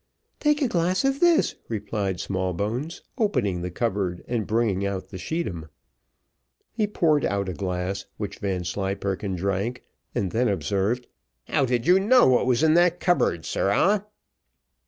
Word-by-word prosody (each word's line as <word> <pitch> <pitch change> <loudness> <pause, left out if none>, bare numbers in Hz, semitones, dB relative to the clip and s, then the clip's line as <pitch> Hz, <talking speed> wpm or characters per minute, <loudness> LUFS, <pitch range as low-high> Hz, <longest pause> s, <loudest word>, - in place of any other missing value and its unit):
"Take 295 0 +2
a - - +3
glass 180 +3 +1
of 270 0 +1
this," 345 -2 +4 0.2
replied 100 -4 -2
Smallbones, 100 - -3 0.2
opening 125 - +1
the 90 - -3
cupboard, 95 -3 -2
and 115 -4 -2
bringing 110 -4 +1
out 100 -1 -3
the 95 - -8
scheedam. 90 - -4 1.0
He 215 -2 0
poured 155 -8 +2
out 100 -1 0
a 90 - -3
glass, 90 0 -3
which - - -5
Vanslyperken 95 +1 -2
drank, 100 +7 -2 0.3
and 95 -3 -1
then 125 +2 +1
observed, 100 - 0 0.4
"How 140 - +1
did 120 -1 0
you 180 +2 +6
know 245 +6 +5
what 125 0 +3
was 130 +3 +2
in 155 -1 +5
that 175 +1 +4
cupboard 130 - +1
sirrah?" 195 - +1
105 Hz, 145 wpm, -25 LUFS, -, 1.0 s, you